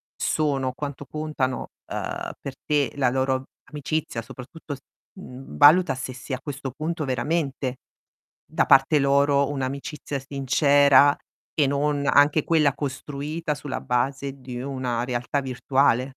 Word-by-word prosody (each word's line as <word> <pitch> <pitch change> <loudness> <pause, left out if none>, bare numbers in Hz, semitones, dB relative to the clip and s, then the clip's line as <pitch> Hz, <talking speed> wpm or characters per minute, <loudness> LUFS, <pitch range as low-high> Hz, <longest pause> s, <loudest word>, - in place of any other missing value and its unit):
sono, 140 -4 0
quanto 145 0 -6
contano, 150 -3 -3 0.2
uhm, - - -4
per - - -6
te 145 -4 +1
la 130 -3 +3
loro 130 0 0 0.2
amicizia, 150 -5 -3
soprattutto 130 +5 -9
s 140 - -9 0.4
mhmm, 130 -6 -10
valuta 150 +1 +7
se 130 0 -5
sia 130 +1 -5
questo 140 -3 -5
punto 155 +3 -3
veramente 135 0 -1 0.7
da - - 0
parte 135 +3 +5
loro 140 0 +3
un'amicizia 140 +1 -4
sincera 140 +1 +4 0.4
e 145 -3 +3
non 140 0 0
anche 145 +1 +5
quella 155 -4 +3
costruita 145 +3 -4
sulla 140 -2 -5
base 135 +2 -1
di 125 -1 -6
una 130 -3 -2
realtà 125 +3 -1
virtuale. 130 -1 +2
140 Hz, 125 wpm, -24 LUFS, 130-145 Hz, 0.7 s, valuta